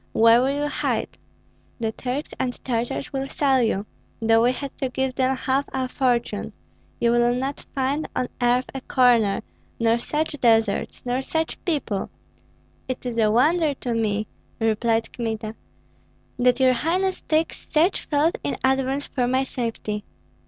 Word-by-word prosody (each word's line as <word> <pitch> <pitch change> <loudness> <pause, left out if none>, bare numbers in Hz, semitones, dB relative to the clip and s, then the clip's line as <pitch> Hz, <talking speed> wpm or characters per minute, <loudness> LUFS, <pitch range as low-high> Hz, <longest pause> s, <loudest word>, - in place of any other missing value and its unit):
Where 230 +1 +6
will 280 +3 0
you - - +1
hide? 290 - -2 0.6
The 225 -1 -1
Turks 255 +6 -4
and 255 -1 0
Tartars 245 +4 -2
will 270 0 -2
sell 270 -3 +2
you, 215 -3 0 0.3
though 225 0 +4
we 240 +2 +4
had 275 +1 -6
to 265 - -1
give 265 +1 -1
them 260 0 +1
half 270 +2 0
our 260 -1 -1
fortune. 240 -5 0 0.5
You 235 - +3
will 240 0 +3
not 270 +3 -4
find 275 +3 0
on 250 - -1
earth 245 +1 +3
a 270 - -5
corner, 235 -6 +3 0.4
nor 230 0 +3
such 305 +6 -1
deserts, 225 -3 +2
nor 250 +1 0
such 320 +4 -3
people 285 - -1 0.4
" - - -36
"It 255 - -4
is 235 -2 -2
a 215 -1 +4
wonder 295 +6 +3
to 245 -2 -3
me," 215 -2 0 0.3
replied 225 0 +1
Kmita, 220 -2 -3 0.9
"that 250 +1 +3
your 260 -1 +5
highness 360 +9 0
takes 315 +1 0
such 335 +5 +1
thought 300 +3 +1
in 140 0 -2
advance 265 +1 +1
for 250 -3 -1
my 260 +2 +2
safety. 225 -5 -3
250 Hz, 160 wpm, -24 LUFS, 230-275 Hz, 0.9 s, Where